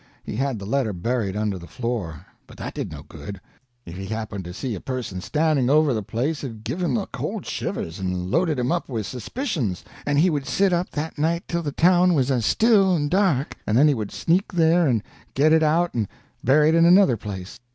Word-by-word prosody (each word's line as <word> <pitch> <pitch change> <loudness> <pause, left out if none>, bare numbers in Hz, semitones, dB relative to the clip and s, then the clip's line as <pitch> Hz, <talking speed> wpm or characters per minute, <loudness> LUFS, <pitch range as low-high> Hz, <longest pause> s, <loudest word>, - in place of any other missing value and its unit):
He - - -6
had 135 -2 -1
the 100 - -7
letter 115 -1 0
buried 100 +2 -2
under 105 -3 -1
the 85 - -11
floor, 105 - -4 0.2
but - - -14
that - - -6
did - - -4
no - - -8
good; 100 -2 -9 0.5
if 85 - -9
he 95 0 -6
happened 110 -2 -4
to 90 - -6
see 120 +7 -4
a 100 - -4
person 120 -7 -4
standing 150 - +1
over 150 -1 +4
the 110 - -1
place 130 +10 -2
it'd 115 -5 -7
give 175 +10 -3
him 160 -8 +1
the - - -1
cold - - -5
shivers, 80 +3 -4
and 90 -1 -3
loaded 165 +1 +2
him 125 0 0
up 175 -3 -1
with 115 -5 -3
suspicions, 125 - -3 0.2
and 145 -1 0
he 175 +4 +4
would 145 -3 -2
sit 195 -2 +2
up 175 +1 0
that 155 0 -5
night 170 +3 +1
till 170 0 -1
the 150 -3 -3
town 180 +3 +4
was 135 -2 +2
still 195 - +4
and 145 -2 -1
dark, 180 -8 +1
and 110 - +2
then 145 +4 +6
he 150 - +4
would 110 -5 -4
sneak 180 +4 0
there 170 -1 +3
and 115 -5 +1 0.3
get 155 +3 +4
it 160 - +5
out 165 +3 +2
and 110 -4 -1 0.4
bury 150 +4 +5
it - - +3
in 165 0 +5
another 180 -6 +6
place. 95 -4 -7
135 Hz, 225 wpm, -23 LUFS, 110-165 Hz, 0.5 s, then